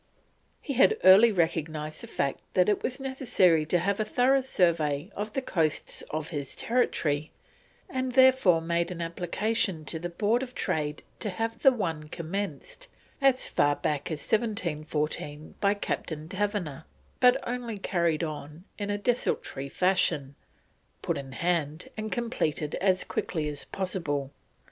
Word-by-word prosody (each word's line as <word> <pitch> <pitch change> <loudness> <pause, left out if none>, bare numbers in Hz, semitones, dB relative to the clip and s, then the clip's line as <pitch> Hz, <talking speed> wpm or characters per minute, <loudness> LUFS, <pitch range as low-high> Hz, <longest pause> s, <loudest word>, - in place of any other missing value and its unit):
He 280 - -3
had 270 - +5
early 205 +5 +8
recognised 160 -4 -1
the - - -6
fact 140 -1 -1 0.2
that 180 -1 +4
it 210 - +1
was 255 +1 -2
necessary 220 - +2
to 180 - +3
have 195 +4 0
a - - +3
thorough 265 +3 +3
survey 170 - +1
of 210 +1 -4
the 270 - -1
coasts 160 - -1
of 155 0 -3
his 145 -4 -5
territory, 155 -11 0 0.6
and 255 -1 -2
therefore 260 -10 +6
made 170 +1 0
an 180 -2 -6
application 175 +1 -1
to 160 +3 -4
the 175 +2 -4
Board 215 +7 +1
of 255 -1 -6
Trade 150 -1 -2 0.2
to 210 - -1
have 225 +4 -3
the 270 - +7
one 165 -10 -3
commenced 175 - -5 0.3
as 270 -2 +4
far 145 0 +2
back 145 -1 -2
as 155 -3 -3
1714 155 -8 -2
by 200 0 +3
Captain 160 -6 -4
Taverner, 185 -6 -2 0.3
but 250 -1 +6
only 240 -3 -3
carried 170 -4 0
on 150 +1 -6 0.2
in 205 0 -3
a 205 - 0
desultory 205 - -1
fashion, 150 -6 +1 0.7
put - - 0
in 135 -1 -6
hand 165 0 -1
and 215 0 -4
completed 155 - -1
as 185 -1 +3
quickly 155 -4 -2
as 145 -1 -5
possible. 150 -8 -3
175 Hz, 150 wpm, -28 LUFS, 155-220 Hz, 0.7 s, early